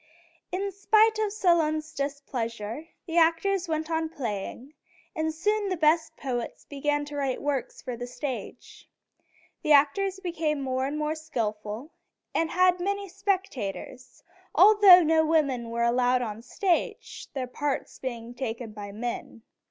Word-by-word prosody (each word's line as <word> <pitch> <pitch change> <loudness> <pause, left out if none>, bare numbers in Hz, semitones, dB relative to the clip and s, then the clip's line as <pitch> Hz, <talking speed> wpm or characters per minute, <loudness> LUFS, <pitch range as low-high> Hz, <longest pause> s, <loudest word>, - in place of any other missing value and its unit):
In 395 +2 -2
spite 435 +3 +3
of 430 -2 0
Solon's 320 -6 +1
displeasure, 270 -2 -4 0.2
the 330 0 -3
actors 345 +3 +2
went 315 0 -2
on 320 0 0
playing, 245 0 -5 0.4
and 315 0 0
soon 410 +5 0
the 370 - -1
best 320 +1 +2
poets 245 -4 -4
began 290 +1 -1
to 290 0 -8
write 270 -3 -1
works 275 -4 -3
for 250 -2 -4
the 245 +1 -6
stage. 250 +1 -7 0.7
The 305 - +4
actors 375 +7 +3
became 330 -5 -1
more 260 -1 -1
and 290 +2 -3
more 300 0 0
skillful, 230 -4 -4 0.4
and 325 0 +1
had 365 0 +3
many 400 +2 -2
spectators, 360 - -4 0.3
although 400 -4 +8
no 320 0 +4
women 280 -7 +1
were 235 0 -1
allowed 250 +1 +3
on 215 -3 -4
the - - -11
stage, 350 - -2
their 260 -2 -1
parts 275 +3 -3
being 240 -2 -5
taken 240 -2 -4
by 205 -1 -8
men. 230 +1 -5
300 Hz, 145 wpm, -27 LUFS, 245-345 Hz, 0.7 s, although